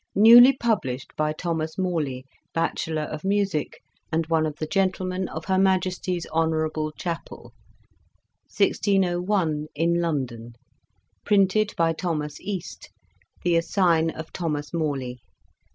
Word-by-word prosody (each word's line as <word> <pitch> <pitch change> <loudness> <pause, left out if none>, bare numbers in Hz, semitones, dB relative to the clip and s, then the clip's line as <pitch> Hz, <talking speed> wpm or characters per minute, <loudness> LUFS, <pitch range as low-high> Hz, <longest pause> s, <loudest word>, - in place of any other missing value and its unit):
Newly 240 +6 +8
published 165 - -2
by 155 0 0
Thomas 160 0 -3
Morley 155 -9 -2 0.3
Batchelar 160 -1 -1
of 150 0 -6
Musick, 195 -6 -1 0.3
and 165 0 0
one 160 -1 +1
of 150 - -5
the 155 - -4
Gentlemen 185 +2 -1
of 160 +1 -7
Her 190 -1 +1
Majesties 185 -2 0
Honourable 155 -1 0
Chappell 165 -8 -6 1.0
1601 180 -5 +1
In 170 +3 +1
London 125 -8 -3 0.7
Printed 205 +1 +2
by 165 -1 +2
Thomas 155 -3 -3
Este, 190 -3 -6 0.5
The 175 -1 +2
Assigne 165 -2 +2
of 160 0 -8
Thomas 150 -4 -3
Morley. 140 -6 -2
165 Hz, 115 wpm, -24 LUFS, 155-185 Hz, 1.0 s, Newly